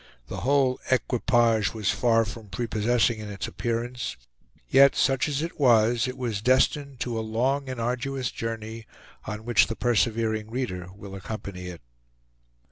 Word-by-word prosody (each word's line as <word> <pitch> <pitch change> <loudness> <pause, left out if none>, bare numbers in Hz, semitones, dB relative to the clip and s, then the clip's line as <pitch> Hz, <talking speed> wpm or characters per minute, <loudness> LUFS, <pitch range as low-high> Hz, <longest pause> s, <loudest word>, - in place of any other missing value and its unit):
The - - -5
whole 135 -1 +2
equipage 120 -4 +2
was 105 -3 +1
far 115 -2 +3
from 110 -1 -9
prepossessing 115 +2 +1
in 105 -1 -7
its 100 -1 -4
appearance; 120 - -3 0.5
yet, 140 - +6
such 135 +1 +2
as 145 0 -1
it 170 - -6
was, 120 -2 +4
it 130 +1 -5
was 115 -6 -2
destined 130 +3 +2
to 120 -2 -2
a - - -1
long 130 +5 0
and 130 -2 -5
arduous 125 +2 -2
journey, 115 0 -5 0.4
on 110 +1 -6
which 120 -2 +4
the 115 - -4
persevering 110 -2 0
reader 110 -8 -3
will 100 -1 -10
accompany 95 -2 -6
it. 90 -5 -8
115 Hz, 150 wpm, -26 LUFS, 110-130 Hz, 0.5 s, yet